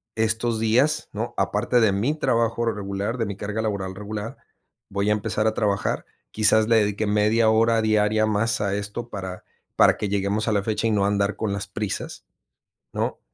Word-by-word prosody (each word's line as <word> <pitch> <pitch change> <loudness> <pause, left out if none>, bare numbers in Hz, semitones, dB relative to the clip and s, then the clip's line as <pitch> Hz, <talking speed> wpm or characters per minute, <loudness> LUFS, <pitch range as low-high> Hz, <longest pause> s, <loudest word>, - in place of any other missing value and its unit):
estos 110 +1 0
días, 130 +8 +2
¿no? - - -4
Aparte 125 - +1
de 110 - +4
mi 115 +10 0
trabajo 115 -1 +1
regular, 100 +1 -3
de 115 - +1
mi 100 0 -5
carga 105 +2 -3
laboral 100 -3 -3
regular, 105 +4 -6 0.5
voy 100 +1 -1
a - - +4
empezar 105 +1 -1
a 110 - +1
trabajar, 100 -2 -1 0.3
quizás 110 0 +4
le 115 - +4
dedique 105 0 0
media 105 +2 +3
hora 115 +1 +3
diaria 110 0 +2
más 110 +2 +1
a 100 -1 0
esto 105 +4 -5
para 95 -3 -6 0.3
para - - +5
que 105 - -3
lleguemos 100 +2 -1
a - - +2
la 100 -2 +2
fecha 110 +1 -1
y - - +1
no 100 -2 +2
andar 100 0 0
con 110 -3 -2
las 100 -1 -4
prisas, 100 0 -5 0.7
¿no? - - -2
105 Hz, 185 wpm, -24 LUFS, 100-110 Hz, 0.7 s, para